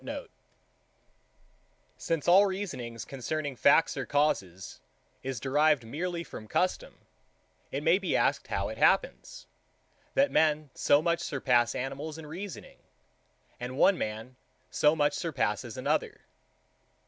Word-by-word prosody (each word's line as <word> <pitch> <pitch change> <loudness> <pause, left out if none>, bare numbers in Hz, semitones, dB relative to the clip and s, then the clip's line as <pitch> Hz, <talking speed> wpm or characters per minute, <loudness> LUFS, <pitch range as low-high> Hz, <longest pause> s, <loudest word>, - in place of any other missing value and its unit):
Since 165 -3 -3
all 195 +4 +7
reasonings 130 - -5
concerning 145 +1 -4
facts 140 +6 +4
or 135 -4 -4
causes 95 - -1 0.4
is 130 -3 -4
derived 145 0 +2
merely 170 +8 -4
from 110 - -10
custom, 180 - -2 0.7
it 140 +2 -3
may 170 +4 +4
be 195 - -1
asked - - +1
how - - -2
it - - -8
happens, - - +1 0.7
that 280 +1 +3
men 155 -2 +2
so 145 +2 +3
much 170 0 +1
surpass 125 -4 +1
animals 140 +4 -5
in 160 - -9
reasoning, 180 +6 -8 0.8
and 125 +2 -6
one 195 - +5
man 110 0 -5 0.3
so 150 +1 +3
much 145 -2 +2
surpasses - - -2
another? - - -1
150 Hz, 120 wpm, -29 LUFS, 130-165 Hz, 0.8 s, all